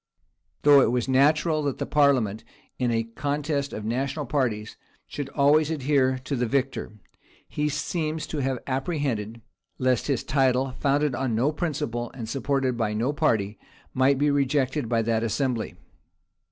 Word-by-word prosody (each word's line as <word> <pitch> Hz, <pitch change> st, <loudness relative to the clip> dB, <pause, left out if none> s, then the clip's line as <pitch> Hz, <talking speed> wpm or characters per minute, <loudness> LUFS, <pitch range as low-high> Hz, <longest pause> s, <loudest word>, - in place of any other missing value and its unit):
Though 145 Hz, -1 st, +8 dB
it -, -, +3 dB
was 125 Hz, 0 st, 0 dB
natural 150 Hz, +4 st, +3 dB
that 140 Hz, -3 st, -2 dB
the -, -, -2 dB
parliament, 130 Hz, -8 st, +2 dB, 0.4 s
in 125 Hz, -1 st, +1 dB
a 115 Hz, -1 st, +1 dB
contest 140 Hz, +4 st, -2 dB
of 105 Hz, -, -6 dB
national 135 Hz, +6 st, -2 dB
parties, 120 Hz, -6 st, -1 dB, 0.3 s
should 145 Hz, -2 st, -6 dB
always 150 Hz, +2 st, +3 dB
adhere 135 Hz, -3 st, +1 dB
to 140 Hz, -, -2 dB
the 125 Hz, -1 st, 0 dB
victor, 135 Hz, -2 st, -1 dB, 0.5 s
he 150 Hz, 0 st, -1 dB
seems 155 Hz, +1 st, -2 dB
to 155 Hz, -, -4 dB
have 135 Hz, -1 st, 0 dB
apprehended, 130 Hz, -, -2 dB, 0.4 s
lest 130 Hz, -2 st, +1 dB
his 135 Hz, -5 st, 0 dB
title, 130 Hz, -1 st, +1 dB
founded 145 Hz, 0 st, +1 dB
on 120 Hz, -2 st, -1 dB
no 130 Hz, +7 st, +2 dB
principle, 145 Hz, -7 st, -3 dB
and 115 Hz, -4 st, -6 dB
supported 135 Hz, +1 st, 0 dB
by 110 Hz, -3 st, -1 dB
no 120 Hz, +7 st, 0 dB
party, 110 Hz, -10 st, 0 dB, 0.3 s
might 130 Hz, +1 st, +3 dB
be 145 Hz, +1 st, +2 dB
rejected 140 Hz, -2 st, 0 dB
by 115 Hz, -1 st, +2 dB
that 115 Hz, 0 st, +1 dB
assembly. 115 Hz, -3 st, -1 dB
135 Hz, 155 wpm, -25 LUFS, 120-145 Hz, 0.5 s, Though